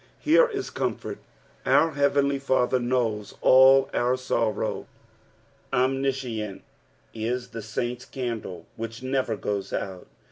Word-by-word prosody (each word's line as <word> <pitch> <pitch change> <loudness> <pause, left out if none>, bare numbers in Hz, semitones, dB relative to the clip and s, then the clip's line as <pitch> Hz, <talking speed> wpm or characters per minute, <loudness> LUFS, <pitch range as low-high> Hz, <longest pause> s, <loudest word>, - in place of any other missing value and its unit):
Here 330 +11 +5
is 405 -4 -5
comfort. - - -3 0.4
Our 165 - +4
heavenly 140 -1 +2
Father 130 -2 +1
knows 120 -4 -1
all 135 +1 +7
our 125 +1 +1
sorrow. 115 -3 -1 0.8
Omniscience 130 -5 -1 0.5
is 120 +3 -3
the 115 -1 -6 0.2
Raint's 120 0 -2
candle 115 - -5
which 115 +2 -6
never 130 -3 0
goes 100 -1 -3
oat. 95 -2 -4
125 Hz, 110 wpm, -26 LUFS, 115-135 Hz, 0.8 s, all